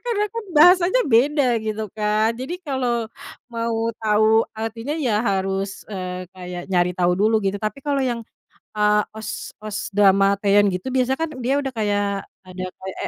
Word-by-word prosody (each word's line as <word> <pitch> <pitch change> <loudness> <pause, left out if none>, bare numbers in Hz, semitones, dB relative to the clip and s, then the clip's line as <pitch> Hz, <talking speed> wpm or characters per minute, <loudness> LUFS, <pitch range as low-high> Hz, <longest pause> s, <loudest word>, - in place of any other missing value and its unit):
karena 455 -4 -1
kan 460 -1 -5
bahasanya 355 +7 +6
beda 280 +5 +4 0.2
gitu 220 0 -3
kan, 215 +1 +1
jadi 260 +9 -5
kalau 250 -5 -1 0.5
mau 230 0 -1
tahu 220 +1 +3
artinya 225 +6 -4
ya 240 -9 +1
harus, 195 -2 -2
eee, 185 -1 -5
kayak 180 -1 -7
nyari 180 0 +2
tahu 180 -1 +2
dulu 220 +2 +4
gitu. 195 +1 -1
Tapi 215 +6 -4
kalau 285 -1 0
yang, 240 -3 -2 0.5
eee, 210 0 +4 0.2
OST-OST 215 -1 -6
drama 195 0 +5
Taeyeon 205 0 +4
gitu, 185 +8 -4
biasanya 260 0 +1
kan 325 -1 -2
dia 265 +4 +1
udah 270 -2 -2
kayak 205 -2 -1 0.2
ada 185 0 -7
kayak 190 0 -8
220 Hz, 155 wpm, -22 LUFS, 200-260 Hz, 0.5 s, bahasanya